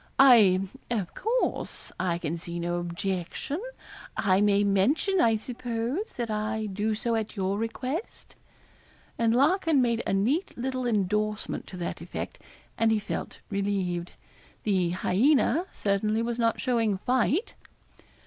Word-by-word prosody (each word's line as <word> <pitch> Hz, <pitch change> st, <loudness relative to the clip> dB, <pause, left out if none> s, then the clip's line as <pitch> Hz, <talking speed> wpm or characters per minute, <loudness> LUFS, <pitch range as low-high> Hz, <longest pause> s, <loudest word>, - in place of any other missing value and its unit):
'I 225 Hz, -9 st, +7 dB, 0.3 s
of 210 Hz, -7 st, -2 dB
course 475 Hz, +4 st, -1 dB
I 180 Hz, -2 st, 0 dB
can 165 Hz, -1 st, -3 dB
see 170 Hz, 0 st, -5 dB
no 175 Hz, +1 st, -1 dB
objection. 185 Hz, -, -3 dB, 0.6 s
I 190 Hz, 0 st, +3 dB
may 205 Hz, 0 st, +4 dB
mention, 265 Hz, -, +2 dB
I 225 Hz, -1 st, +4 dB
suppose, 245 Hz, -, -3 dB
that 235 Hz, -3 st, -3 dB
I 215 Hz, +1 st, -1 dB
do 210 Hz, +2 st, -1 dB
so 235 Hz, +2 st, -1 dB
at 220 Hz, -1 st, -2 dB
your 195 Hz, 0 st, -1 dB
request.' 255 Hz, -, -4 dB, 0.8 s
And 230 Hz, 0 st, +3 dB
Larkin 320 Hz, +2 st, +3 dB
made 235 Hz, -2 st, +2 dB
a -, -, +1 dB
neat 260 Hz, -, 0 dB
little 255 Hz, 0 st, -2 dB
endorsement 210 Hz, 0 st, -1 dB
to 185 Hz, -, -8 dB
that 175 Hz, -, -4 dB
effect, -, -, -6 dB, 0.4 s
and 225 Hz, -1 st, +4 dB
he 220 Hz, -, +3 dB
felt 210 Hz, -, -5 dB
relieved. 195 Hz, -3 st, -1 dB, 0.5 s
The 185 Hz, -5 st, +2 dB
hyaena 260 Hz, -, +2 dB
certainly 210 Hz, +2 st, 0 dB
was 235 Hz, 0 st, -2 dB
not 230 Hz, -1 st, +2 dB
showing 230 Hz, -6 st, +1 dB
fight. 255 Hz, -, +1 dB
220 Hz, 135 wpm, -27 LUFS, 195-250 Hz, 0.8 s, I